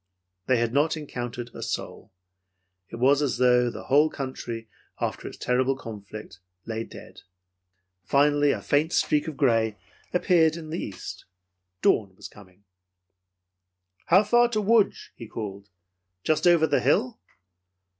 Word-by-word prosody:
They 130 - +3
had 115 0 0
not 155 +3 +2
encountered 120 -5 -6
a - - -9
soul. 105 - -5 0.8
It - - -8
was 135 +4 +3
as 145 -3 0
though 125 -1 +4
the - - -8
whole 150 +3 +4
country, 120 -5 -6 0.3
after - - -3
its - - -9
terrible 130 +2 +1
conflict, 105 -4 -9 0.3
lay 115 0 -3
dead. - - -13 0.8
Finally 145 +6 +3
a - - -3
faint 155 +4 +1
streak 150 +1 +1
of 155 -3 -6
gray 115 -6 +2 0.3
appeared 170 -3 +3
in 160 -2 -8
the 170 - -3
east. 100 - -7 0.6
Dawn 100 -4 +2
was - - -9
coming. 100 -1 -18 1.4
"How 185 +5 +6
far 240 +3 +4
to 220 -3 -1
Lodz?" 215 0 +2
he 115 - -9
called. 100 -2 -7 0.5
"Just 155 +2 +2
over 170 -2 +5
the - - +2
hill?" 235 +2 +1
135 Hz, 140 wpm, -26 LUFS, 115-160 Hz, 1.4 s, How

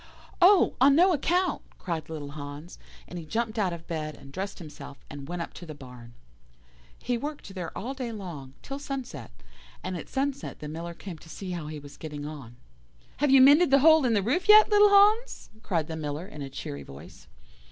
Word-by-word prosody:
"'Oh! 370 +1 +6
on 275 +1 +7
no 360 +4 +5
account,' 355 +5 +1 0.2
cried 165 -4 -4
little 150 -3 -6
Hans 145 +3 -9 0.3
and 175 - -7
he 165 - -9
jumped 225 +3 -2
out 190 -4 +1
of 170 -1 -7
bed, 155 -3 -4
and 135 - -14
dressed 195 +2 -4
himself, 145 -4 -10
and 140 -1 -8
went 175 0 -3
up - - -10
to 175 - -10
the 155 - -8
barn. 125 -4 -13 0.8
"He 245 -1 -2
worked 290 -7 -6
there 180 -4 -5
all 260 +4 -4
day 255 -3 -5
long, 165 -11 -8
till 275 0 -6
sunset, 275 -3 -6 0.5
and 185 - -3
at 170 - -7
sunset 275 0 -3
the 150 - -8
Miller 170 +3 -6
came 175 -4 -9
to 165 - -16
see 185 +2 -7
how 170 -4 -5
he 155 0 -6
was 145 -1 -12
getting 150 -2 -7
on. 140 -6 -9 0.6
"'Have 290 +1 +1
you 265 0 +7
mended 290 +6 +7
the 275 - +6
hole 315 0 +7
in 235 -3 +2
the 200 - +2
roof 340 - 0
yet, 430 0 +8
little 415 0 +7
Hans?' 420 +4 +4
cried 170 -8 -1
the 160 - -6
Miller 150 +1 -4
in 150 -6 -10
a 135 - -5
cheery 100 - -6
voice. 70 +1 -13
180 Hz, 205 wpm, -27 LUFS, -, 0.8 s, yet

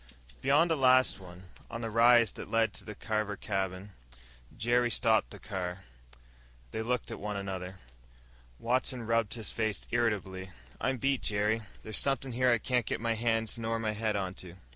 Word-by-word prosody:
Beyond 155 - +4
the - - +4
last 130 -4 +4
one, 90 -1 -12 0.3
on 115 - -5
the 115 -1 -3
rise 115 0 +6
that - - -9
led 115 -2 +2
to - - -9
the 105 - -8
Carver 110 -1 -2
cabin, 95 0 -3 0.7
Jerry 120 +1 +2
stopped 115 -2 +3
the - - -10
car. 95 -2 -5 0.9
They 110 - -3
looked 120 +1 -2
at - - -5
one 105 0 -3
another. 95 -1 -5 0.8
Watson 125 0 0
rubbed 115 -1 +1
his 110 -2 -3
face 110 -2 -1
irritably. 100 -5 -1 0.3
"I'm 130 0 0
beat, 135 +1 +1
Jerry. 105 +2 +1 0.2
There's 110 - -1
somethin' 135 -1 0
here 125 +1 +2
I 120 - +5
can't 125 +1 0
get - - -1
my 115 0 0
hands 115 0 0
nor 115 0 -1
my 110 -1 -1
head 105 0 -1
onto." 95 -2 -4
115 Hz, 170 wpm, -31 LUFS, 100-120 Hz, 0.9 s, rise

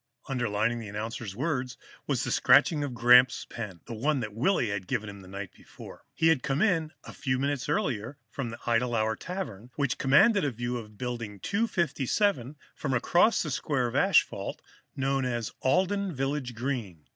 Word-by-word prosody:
Underlining 120 -3 0
the 110 - -7
announcer's 105 0 -5
words 130 -2 -2 0.3
was - - 0
the - - -2
scratching 150 -3 +4
of 135 -4 -4
Gramps' 125 +1 +6
pen, 100 -7 -7
the - - -7
one 130 +2 0
Willy 120 - +1
had 95 -2 -4
given 110 -4 -2
him 100 -1 -9
the 95 - -14
night 100 0 -7
before. - - -13
He 160 - +4
had 155 -5 +3
come 140 0 -1
in, 165 -7 +1
a - - -10
few 130 -2 -1
minutes 140 0 -1
earlier, 135 - -1
from 130 -4 -4
the 115 - -7
Idle 120 +1 +1
Hour 110 0 +1
Tavern, 125 - -6
which 140 -3 -1
commanded 160 - +5
a 145 - +2
view 120 0 -3
of 105 -3 -10
Building 115 -4 -5
257 175 - 0 0.2
from 135 -4 -2
across 180 - +3
the 155 - -4
square 135 -2 0
of 120 - -3
asphalt - - +2 0.3
known 135 0 0
as 120 -3 -2
the - - -19
Alden 190 +5 +1
Village 135 -2 -2
Green. 115 - -4
125 Hz, 180 wpm, -28 LUFS, 115-150 Hz, 0.3 s, Gramps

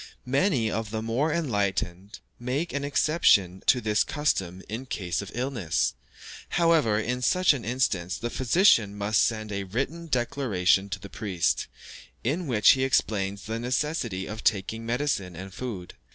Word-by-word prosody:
Many 130 - +1
of 110 -2 -3
the 110 0 -3
more 125 +8 0
enlightened 100 - -2 0.2
make 130 +7 -2
an 140 0 -2
exception 140 - +3
to 125 - +5
this 105 -2 +2
custom 95 - -1
in 120 +5 -6
cases 90 -6 -2
of 100 - -8
illness; 120 - -1 0.6
however, 165 -11 +3
in 125 +3 -2
such 180 +7 +4
an 130 -5 -5
instance 100 -7 -1
the 120 - -4
physician 120 - +3
must 105 +1 +2
send 110 -2 -1
a 100 -1 -2
written 140 - -3
declaration 120 - +1
to 95 +1 -4
the 100 - -9
priest, 95 -4 -1 0.6
in 155 +8 -1
which 110 -5 +6
he 130 - +2
explains 100 -6 0
the 110 +1 -4
necessity 120 -6 -2
of 110 +1 -7
taking 110 +3 0
medicine 120 -8 -1
and 95 +2 -8
food. 100 -5 -6
115 Hz, 150 wpm, -26 LUFS, 100-135 Hz, 0.6 s, which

